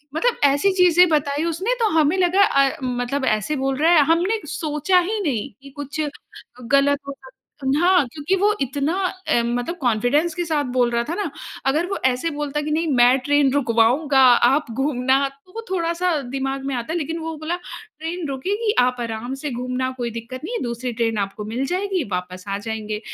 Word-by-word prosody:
मतलब 480 +9 +1
ऐसी 285 +8 +3
चीज़ें 360 -1 +5
बताई 290 0 0
उसने 370 +9 -1
तो 445 - +2
हमें 310 +4 +3
लगा 370 +2 +4
अ, 275 -6 +2
मतलब 250 +2 -2
ऐसे 215 +7 0
बोल 270 0 -1
रहा 320 +4 +3
है 300 -4 +6
हमने 355 +7 +2
सोचा 305 +4 +1
ही 420 +5 -1
नहीं, 255 - -2
कि 275 - -12
कुछ 285 +2 -5 0.7
गलत 280 +1 +4
हो 280 - -4
सक 260 0 -14 0.3
उम, 265 - +1
हाँ, 360 -5 +4
क्योंकि 315 +5 0
वो 410 +2 +2
इतना 280 +4 -1 0.3
अ, 235 - +3
मतलब 245 +7 -2
कॉन्फिडेंस 255 +8 +1
के 350 -1 -2
साथ 310 -3 0
बोल 245 -1 +3
रहा 235 0 +1
था 335 - -2
ना, 400 -5 -2 0.4
अगर 300 +6 +2
वो 395 - -3
ऐसे 260 +6 +1
बोलता 295 0 -3
कि 300 +1 -4
नहीं 325 +2 0
मैं 245 +2 +5
ट्रेन 285 0 +2
रुकवाऊँगा 265 +2 +2 0.3
आप 275 -3 0
घूमना 265 +1 +1
तो 275 +7 -24
वो 455 - -4
थोड़ा-सा 345 0 0 0.2
दिमाग 270 0 -3
में 275 - -2
आता 240 +5 -4
है। - - 0
लेकिन 325 +2 -3
वो 325 0 -5
बोला 315 +3 -3 0.4
ट्रेन 330 +1 -4
रुकेगी 400 - -1
आप 250 0 +1
आराम 235 +2 -4
से 295 - -2
घूमना 255 +1 -2
कोई 240 -1 -3
दिक्कत 235 +4 -7
नहीं 460 - -5
है - - -3
दूसरी 240 +1 -3
ट्रेन 225 -1 -1
आपको 200 +1 -3
मिल 240 +5 -2
जाएगी 370 +1 -1
वापस 180 +1 -5
आ 200 0 -2
जाएँगे। 215 0 -4
280 Hz, 195 wpm, -21 LUFS, 250-335 Hz, 0.7 s, है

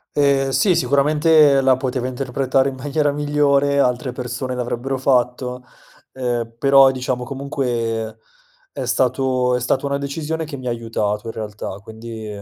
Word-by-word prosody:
Ehm, 140 -2 +3
sì, 185 +7 +3
sicuramente 150 +1 +4
la 130 -1 +4
poteva 130 -1 -2
interpretare 130 +1 0
in 135 - -8
maniera 145 +2 0
migliore, 145 -1 +2
altre 125 -1 +1
persone 125 +1 -4
l'avrebbero 125 +2 -3
fatto, 125 -1 0 0.5
ehm, 120 -3 -3
però 135 +1 +6
diciamo 130 -1 -2
comunque 120 -5 -3 0.5
è - - -5
stato 130 -1 +1
è - - -3
stata 130 +3 0
una 140 0 0
decisione 150 +3 -3
che 145 -3 -7
mi 130 - -9
ha - - 0
aiutato 115 -2 -2
in - - -4
realtà, 105 -2 -6
quindi, 110 0 -8
130 Hz, 145 wpm, -20 LUFS, 120-140 Hz, 0.5 s, però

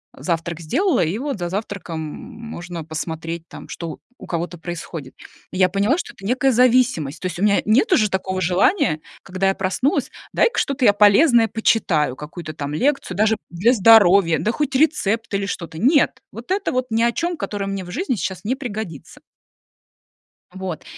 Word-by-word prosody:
завтрак 170 -1 -3
сделала, 290 - +1
и 165 +5 -1
вот 275 -3 -4
за 175 -1 -3
завтраком 195 -4 -5
можно 175 - -8
посмотреть 160 +1 -5
там, - - -11
что 165 -3 -6 0.2
у - - -11
кого-то 175 +1 -3
происходит. 165 -5 -7 0.4
И - - -6
я 185 -1 +5
поняла, 200 - +1
что - - -6
это 195 - -18
некая 255 +4 +2
зависимость, 240 - +2
то - - -6
есть 175 -1 -6
у - - -1
меня 205 -1 +3
нет 225 - +3
уже 215 -12 +4
такого 190 0 -2
желания, 180 - +2 0.2
когда 190 0 -1
я 195 - +2
проснулась: 195 +9 0 0.2
"Дай-ка - - +2
что-то 275 -2 0
я 205 - +6
полезное 225 +4 +5
почитаю, 175 - +1
какую-то 155 +3 -8
там 145 -1 -5
лекцию, 270 - 0
даже 220 +1 +3
для 195 +9 +2
здоровья, 200 -6 +6
да 215 - 0
хоть 270 +2 -2
рецепт 230 -7 +1
или 200 0 0
что-то". 170 -5 -6
Нет, 275 - +3
вот 235 +9 -9
это 390 +1 0
вот 255 0 -1
ни 225 +1 +1
о 235 - +3
чём, 345 +6 -2
которое 205 -6 -4
мне 195 -1 -3
в 180 - -11
жизни 285 - -1
сейчас 185 -1 -4
не 245 +5 -1
пригодится. 220 - -7 1.3
Вот, 190 -4 -6
200 Hz, 175 wpm, -21 LUFS, 170-240 Hz, 1.3 s, я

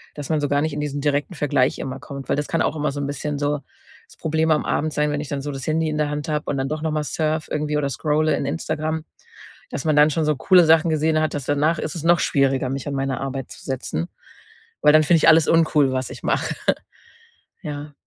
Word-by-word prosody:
dass 145 -2 -7
man 155 -2 +1
so 145 - 0
gar 145 0 +1
nicht 155 -1 -1
in 150 - -4
diesen 145 -1 -3
direkten 145 +4 0
Vergleich 140 -3 +1
immer 135 0 -5
kommt. 140 -2 -9
Weil - - +1
das 145 - -2
kann 165 - 0
auch - - 0
immer 150 -1 0
so 145 - -4
'n 140 - -2
bisschen 145 +1 -3
so 145 0 0 0.5
das - - -19
Problem 160 0 0
am 155 - +2
Abend 155 +1 -1
sein, 150 0 +1
wenn 145 - -2
ich 150 - -6
dann 140 -1 -3
so 145 +1 -4
das 135 -1 -7
Handy 160 0 +1
in 150 - -2
der 150 -1 0
Hand 150 +1 -4
habe 150 -1 -1
und 140 - -1
dann 135 0 -2
doch 155 0 -3
noch 160 0 -1
mal 155 0 -1
surfe 155 +1 -2
irgendwie 150 0 -1
oder 140 -2 0
scrolle 155 +3 +1
in - - -3
Instagram, 155 +1 -2 0.7
dass - - -4
man 155 - +2
dann 150 +1 +7
schon 160 +2 0
so 150 -1 +2
coole 180 +4 +5
Sachen 160 +1 +5
gesehen 155 0 +2
hat, 155 - 0
dass 145 -3 -4
danach 150 +4 +1
ist 155 - -4
es 165 - -5
noch 170 0 +4
schwieriger, 135 -2 +1
mich 135 +1 -4
an 145 - -3
meine 135 -1 -1
Arbeit 135 -1 -5
zu - - -12
setzen, 125 - -3 0.7
weil 150 0 +6
dann 155 0 +6
finde 165 +3 +4
ich - - +3
alles 160 0 +6
uncool, 155 -4 +3
was 130 0 -2
ich - - -9
mache. - - 0 1.1
Ja. 150 0 -6
150 Hz, 255 wpm, -22 LUFS, 140-155 Hz, 1.1 s, dann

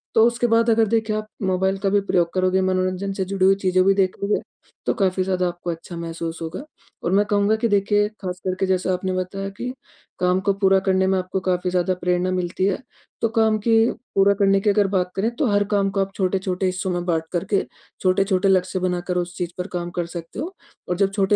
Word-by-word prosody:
तो 225 - +6
उसके 240 0 0
बाद 230 0 +3
अगर 225 -1 +4
देखिए 220 0 0
आप 215 0 -3 0.2
मोबाइल 190 +1 +1
का - - +4
भी 205 +1 +3
प्रयोग 170 -2 +2
करोगे, 185 0 +2
मनोरंजन 185 +1 0
से 190 -1 -2
जुड़ी 190 0 0
हुई 195 +1 +6
चीज़ें 185 -1 +2
भी 195 - +5
देखोगे, 195 +1 0 0.4
तो - - +2
काफ़ी 190 -3 +1
ज़्यादा 185 -1 0
आपको 175 0 -5
अच्छा 165 +1 -8
महसूस 165 0 -5
होगा। 165 - -5 0.4
और 170 - 0
मैं 200 +2 +4
कहूँगा 205 +1 +2
कि 230 +1 +1
देखिए, 205 0 +2
खास 180 -2 -4
करके 185 +1 0
जैसे 185 0 0
आपने 185 0 -1
बताया 190 +2 -3
कि 245 +6 -5 0.5
काम 180 0 +2
को 200 +1 +2
पूरा 195 -1 +3
करने 190 0 +1
में 190 0 +2
आपको 185 +1 -3
काफ़ी 185 -1 0
ज़्यादा 180 +1 +1
प्रेरणा 180 +1 +1
मिलती 180 0 -1
है, 195 -1 0 0.4
तो 230 - +2
काम 220 -1 +2
की 225 +2 +2 0.4
पूरा 195 +1 +5
करने 195 -1 +3
की 210 - +2
अगर 205 0 +3
बात 185 -2 0
करें, 205 +4 +1
तो 290 - 0
हर 205 -1 +3
काम 200 -1 +2
को 195 - -2
आप 195 0 -2
छोटे-छोटे 190 0 -1
हिस्सों 185 0 -1
में 175 0 -2
बाँट 165 -3 0
करके 190 +3 0 0.4
छोटे-छोटे 190 +1 +2
लक्ष्य 185 0 +2
बनाकर 180 0 -1
उस 175 0 -3
चीज़ 175 -2 -3
पर 180 +1 -3
काम 175 -1 -3
कर 175 - -1
सकते 170 +2 -8
हो। 335 +7 -4 0.4
और 180 - 0
जब 195 0 +2
छोटे 195 0 +2
190 Hz, 220 wpm, -22 LUFS, 180-200 Hz, 0.5 s, तो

